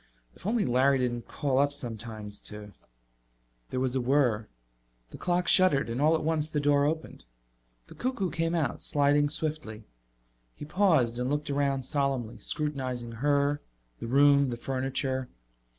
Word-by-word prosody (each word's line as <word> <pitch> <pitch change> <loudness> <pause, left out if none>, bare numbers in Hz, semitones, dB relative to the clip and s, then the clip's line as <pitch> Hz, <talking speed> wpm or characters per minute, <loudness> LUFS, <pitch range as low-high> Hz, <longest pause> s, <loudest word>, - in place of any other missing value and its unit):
If - - -9
only 220 -2 +1
Larry 130 +3 +3
didn't 120 -2 -2
call 135 -2 -1
up 145 0 +3
sometimes 110 -5 -6
to 105 -1 -10 1.0
There 130 - -2
was 130 0 -1
a 130 - +1
whirr. 120 -4 +1 0.6
The - - -10
clock 180 0 0
shuddered 145 -10 +4
and 120 +4 -2
all 155 +2 +4
at 160 - -2
once 155 -1 +1
the 155 -1 -2
door 145 0 +3
opened. 155 - -3 0.6
The - - -13
cuckoo 240 -8 -2
came 165 +1 -1
out, 155 -7 -1
sliding 145 0 +2
swiftly. 150 -8 -2 0.7
He - - -8
paused 155 - +2
and 125 +1 -1
looked 145 0 -2
around 140 -1 0
solemnly, 135 -4 -1
scrutinizing 130 -6 -3
her, 145 +4 +1 0.4
the - - -5
room, 140 +2 +4
the 120 - -4
furniture. 130 0 -2
140 Hz, 150 wpm, -28 LUFS, 125-150 Hz, 1.0 s, shuddered